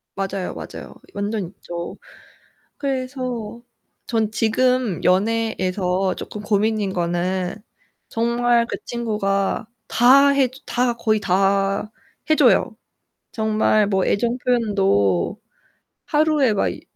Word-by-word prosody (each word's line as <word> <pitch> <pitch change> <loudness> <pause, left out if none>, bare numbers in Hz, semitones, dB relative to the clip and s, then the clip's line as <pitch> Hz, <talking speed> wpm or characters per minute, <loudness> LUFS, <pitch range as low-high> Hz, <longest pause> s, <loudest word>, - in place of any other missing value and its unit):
맞아요, 195 -1 -3
맞아요. - - -9 0.2
완전 205 -1 -2
있죠. 170 -1 -7 0.8
그래서 255 -4 -4 0.5
전 220 -2 0
지금 230 -2 +1
연애에서 190 -2 +1
쪼끔 210 - -7
고민인 210 -1 0
거는 180 +1 -1 0.5
정말 235 0 +1
그 - - -4
친구가 210 -4 -1 0.2
다 270 +4 +6
해 275 -1 +3
주 260 +2 -17
다 245 0 0
거의 215 -2 +1
다 195 +2 +1 0.4
해 310 - +5
줘요. 245 -3 +3 0.6
정말 215 -2 +2
뭐 190 -2 +1
애정 235 +4 0
표현도 195 - +1 0.6
하루에 300 -5 +2
막 195 - +1
이 - - -10
215 Hz, 200 characters per minute, -21 LUFS, 195-240 Hz, 0.8 s, 다